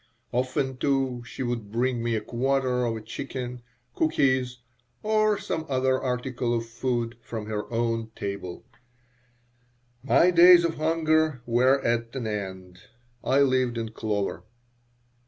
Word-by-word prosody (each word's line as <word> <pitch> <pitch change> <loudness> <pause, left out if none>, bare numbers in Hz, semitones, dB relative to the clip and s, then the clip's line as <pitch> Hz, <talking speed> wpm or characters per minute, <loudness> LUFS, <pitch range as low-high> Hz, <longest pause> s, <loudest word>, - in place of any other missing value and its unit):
Often, 130 +1 -1
too, 135 -2 0
she - - -5
would 120 -4 -3
bring 120 +1 0
me 115 0 0
a 110 - -1
quarter 130 0 0
of 115 -1 -1
a - - -7
chicken, 125 +3 -6 0.3
cookies, 130 -5 +1 0.5
or 215 -1 +2
some 190 -5 -3
other 130 0 +1
article 125 -1 -1
of 115 0 -2
food 120 0 -2
from 110 -2 -6
her 105 0 -4
own 115 -1 -1
table 100 -3 -5 1.4
My 140 +9 +4
days 175 0 +8
of 165 -1 -2
hunger 155 -3 +1
were 125 +3 +3
at 115 +1 0
an 130 -3 -3
end. 95 -4 -5 0.4
I 135 +2 +3
lived 130 -3 +2
in 115 -1 -3
clover. 105 -2 -3
125 Hz, 135 wpm, -26 LUFS, 115-135 Hz, 1.4 s, days